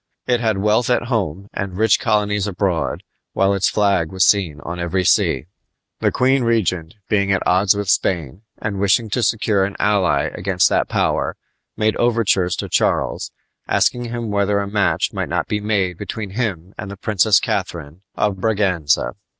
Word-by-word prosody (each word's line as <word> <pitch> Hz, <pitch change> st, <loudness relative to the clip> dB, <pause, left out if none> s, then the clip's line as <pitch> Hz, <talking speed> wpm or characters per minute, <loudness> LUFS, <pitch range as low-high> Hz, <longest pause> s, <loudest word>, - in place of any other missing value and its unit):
It 125 Hz, -1 st, +1 dB
had 110 Hz, -3 st, 0 dB
wealth 105 Hz, +4 st, +1 dB
at 120 Hz, -1 st, 0 dB
home 95 Hz, -3 st, -2 dB
and 95 Hz, -2 st, -4 dB
rich 110 Hz, -1 st, +3 dB
colonies 105 Hz, -3 st, 0 dB
abroad, 90 Hz, -6 st, -1 dB, 0.3 s
while 95 Hz, +1 st, +2 dB
its 100 Hz, -1 st, +1 dB
flag 100 Hz, -6 st, +1 dB
was 95 Hz, -1 st, +2 dB
seen 90 Hz, -8 st, +2 dB
on 85 Hz, +4 st, -6 dB
every 85 Hz, +2 st, -1 dB
sea. -, -, +2 dB, 0.5 s
The -, -, +1 dB
queen 130 Hz, +1 st, +2 dB
regent, 95 Hz, -8 st, 0 dB
being 100 Hz, -2 st, +1 dB
at 95 Hz, -, 0 dB
odds 95 Hz, +2 st, +3 dB
with 100 Hz, -1 st, -3 dB
Spain, 85 Hz, -2 st, 0 dB, 0.2 s
and 105 Hz, -2 st, -4 dB
wishing 100 Hz, +3 st, +2 dB
to 125 Hz, -, 0 dB
secure 105 Hz, -3 st, +1 dB
an 95 Hz, +1 st, -3 dB
ally 100 Hz, -4 st, +2 dB
against 95 Hz, -1 st, +1 dB
that -, -, 0 dB
power, -, -, 0 dB, 0.4 s
made 110 Hz, 0 st, +1 dB
overtures 110 Hz, -7 st, +1 dB
to -, -, -4 dB
Charles, -, -, 0 dB, 0.4 s
asking 120 Hz, 0 st, +1 dB
him 120 Hz, -2 st, -4 dB
whether 100 Hz, 0 st, +1 dB
a 100 Hz, -, -3 dB
match 100 Hz, -2 st, 0 dB
might -, -, -3 dB
not -, -, -1 dB
be 105 Hz, -, -1 dB
made 100 Hz, -4 st, -1 dB
between 105 Hz, 0 st, -5 dB
him 95 Hz, -5 st, -3 dB
and 100 Hz, -, -5 dB
the 100 Hz, -, -8 dB
Princess 105 Hz, 0 st, +3 dB
Catharine 80 Hz, +2 st, -4 dB
of 105 Hz, -2 st, 0 dB
Braganza. 90 Hz, -, +1 dB
100 Hz, 170 wpm, -20 LUFS, 90-110 Hz, 0.5 s, rich